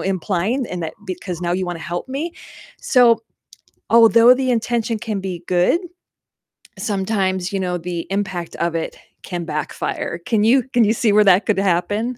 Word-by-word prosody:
implying 195 +6 -1
in 180 - -5
that 160 -1 -5
because 180 -1 -5
now 175 -1 -1
you 185 0 -1
wanna 175 -2 -5
help 175 +8 -5
me?" 305 +6 -4 0.5
So 235 -3 +4 0.7
although 230 +1 +7
the 260 0 -1
intention 230 -1 -1
can 215 -2 -4
be 185 -3 -5
good, 180 - +2 1.0
sometimes, 190 -3 -1
you 195 - 0
know, 180 -1 -1
the 170 0 -5
impact 190 -4 -3
of 170 0 -1
it 165 - -3 0.3
can 175 -2 -5
backfire. 155 +2 -3
Can 220 -4 +1
you 245 +3 +4
can 240 - +4
you 215 - +3
see 225 -2 +1
where 210 - +6
that 195 0 +4
could 210 -4 +1
happen? 205 +6 0
195 Hz, 170 wpm, -20 LUFS, 180-230 Hz, 1.0 s, although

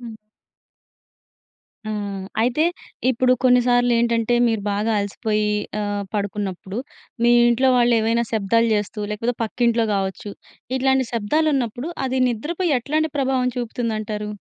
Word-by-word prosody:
హ్మ్. 230 -2 -8 1.7
ఆ! - - -3 0.5
అయితే 250 +7 +2 0.5
ఇప్పుడు 255 +1 +2
కొన్నిసార్లేంటంటే 245 -2 +3
మీరు 225 -3 0
బాగా 210 +3 0
అలసిపోయి 210 +1 -1 0.3
ఆహ్, 205 -1 -2
పడుకున్నప్పుడు. 200 -1 -3 0.4
మీ 240 0 +5 0.2
ఇంట్లో 260 +2 +3
వాళ్లేవైనా 235 -1 +3
శబ్దాలు 230 +2 +2
చేస్తూ, 210 +1 -3
లేకపోతే 230 +3 -2
పక్కింట్లో 235 0 +1
కావచ్చు. 195 +1 -3 0.4
ఇట్లాంటి 265 0 +2
శబ్దాలున్నప్పుడు 255 +3 0 0.2
అది 260 0 -1
నిద్రపై 320 - -2
ఎట్లాంటి 310 +5 -1
ప్రభావం 260 -2 +1
చూపుతుందంటారు? 220 -3 -3
235 Hz, 105 wpm, -22 LUFS, 210-250 Hz, 1.7 s, మీ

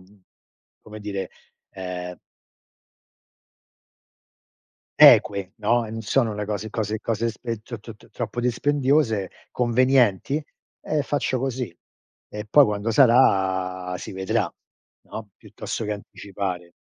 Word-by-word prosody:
mhmm, 95 +2 -22 0.6
come 110 0 -10
dire, 100 -2 -4 0.4
ehm 90 -2 -6 2.8
eque, 100 -2 +6
no, 115 +2 +2
e - - -8
n 115 0 -5
sono 115 0 +1
le 105 - -3
cose 105 +1 -4
cose 110 -1 -2
cose 115 0 -1
e 115 -2 -2
t 120 - -7
t 115 0 -10
t - - -21
troppo 120 0 -5
dispendiose, 130 -3 +1 0.2
convenienti, 125 +1 +2 0.4
e 150 -2 -1
faccio 130 -3 -1
così. 125 -9 -3 0.5
E 105 0 -7
poi 145 +4 +7
quando 105 0 -1
sarà, 95 -7 +3
si - - -8
vedrà, 95 0 -1 0.5
no, 110 -2 -8
piuttosto 110 - -6
che 105 - -2
anticipare. 95 -3 -6
110 Hz, 115 wpm, -24 LUFS, 95-120 Hz, 2.8 s, poi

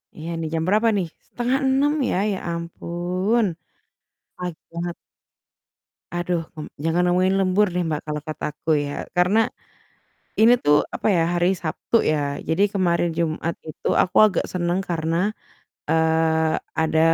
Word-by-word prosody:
Iya 160 +2 -7
nih 160 -1 -3
jam 160 0 0
berapa 215 +4 +3
nih? 180 -3 -1 0.2
05.30 265 +3 +1 0.2
ya, - - 0 0.2
ya 195 - -2 0.2
ampun. 175 +6 -1 0.9
Pagi 180 -3 -6
banget. 170 0 -3 1.2
Aduh, 175 -2 -1
m 155 - -8
jangan 165 +2 +2
ngomongin 185 +2 +3
lembur 195 +2 +3
deh, 180 0 0
Mbak, 150 -1 -2
kalo 150 0 -2
kata 155 -1 -6
aku 160 - -7 0.2
ya. 145 - -4 0.2
Karena, 180 +5 +4 1.0
ini 230 +2 +7
tuh 145 0 +6 0.2
apa - - -3
ya 165 - +3
hari 175 +2 +3
Sabtu 175 +5 -2 0.2
ya. 145 -2 -1
Jadi 160 +5 +2
kemarin 175 -3 +1
Jumat 165 0 -1
itu 155 - -5
aku 180 - -4
agak 190 - 0
seneng 175 0 0
karena, 165 -1 -1 0.7
eee, 160 0 +2 0.3
ada 160 0 +2
175 Hz, 140 wpm, -23 LUFS, 160-185 Hz, 1.2 s, ini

